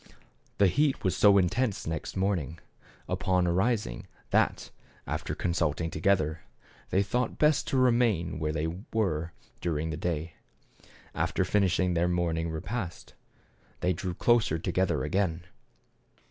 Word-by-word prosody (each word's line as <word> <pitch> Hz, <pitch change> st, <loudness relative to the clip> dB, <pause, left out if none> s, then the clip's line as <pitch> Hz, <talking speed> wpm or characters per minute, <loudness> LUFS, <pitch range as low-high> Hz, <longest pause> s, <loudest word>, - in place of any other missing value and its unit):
The 100 Hz, -, +5 dB
heat 140 Hz, -, +2 dB
was 95 Hz, -, +1 dB
so 100 Hz, -1 st, +6 dB
intense 100 Hz, +4 st, +1 dB
next 80 Hz, -1 st, -4 dB
morning 90 Hz, -5 st, -1 dB, 0.5 s
upon 90 Hz, -1 st, +1 dB
arising 95 Hz, -, 0 dB, 0.2 s
that, -, -, +1 dB, 0.3 s
after -, -, -3 dB
consulting 85 Hz, -2 st, -1 dB
together, 80 Hz, -2 st, +1 dB, 0.5 s
they 95 Hz, -, +2 dB
thought 125 Hz, +3 st, -1 dB
best 150 Hz, -1 st, +3 dB
to 135 Hz, -, 0 dB
remain 115 Hz, -10 st, +2 dB
where 75 Hz, -1 st, -1 dB
they 75 Hz, 0 st, -1 dB, 0.3 s
were 85 Hz, -7 st, 0 dB, 0.3 s
during 80 Hz, -2 st, -2 dB
the 75 Hz, -, -4 dB
day. 80 Hz, -1 st, -3 dB, 0.8 s
After 85 Hz, +3 st, 0 dB
finishing 90 Hz, -2 st, +2 dB
their 85 Hz, +1 st, +2 dB
morning 85 Hz, -2 st, 0 dB
repast, 90 Hz, +4 st, -5 dB, 0.7 s
they 90 Hz, +1 st, +2 dB
drew 90 Hz, +1 st, -4 dB
closer 115 Hz, -9 st, +3 dB
together 90 Hz, +2 st, 0 dB
again. 85 Hz, +1 st, 0 dB
90 Hz, 125 wpm, -29 LUFS, 80-100 Hz, 0.8 s, so